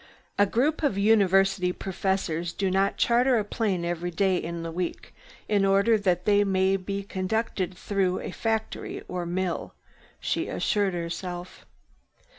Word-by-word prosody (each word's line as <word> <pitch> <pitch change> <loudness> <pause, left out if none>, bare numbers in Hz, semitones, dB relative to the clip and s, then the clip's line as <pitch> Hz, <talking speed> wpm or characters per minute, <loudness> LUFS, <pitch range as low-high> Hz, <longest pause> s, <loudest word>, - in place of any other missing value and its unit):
"A 205 - +5
group 275 +10 +1
of 285 -10 +1
University 195 -3 +3
professors 180 -3 -2
do 195 -1 -1
not 195 +1 +1
charter 245 +1 +3
a 215 - +1
plane 200 -5 -1
every 175 0 -2
day 190 +2 +1
in 170 -1 -3
the 165 - -4
week 175 +1 -4 0.3
in 205 -2 +2
order 195 +4 +4
that 185 -4 0
they 205 -1 +4
may 190 -1 +2
be 195 +1 -3
conducted 190 -1 -2
through 190 -3 0
a - - -5
factory 220 +2 -3
or 180 -1 -4
mill," 180 0 -2 0.4
she - - -1
assured 200 -4 0
herself. 175 +1 -6
190 Hz, 145 wpm, -26 LUFS, 180-205 Hz, 0.4 s, A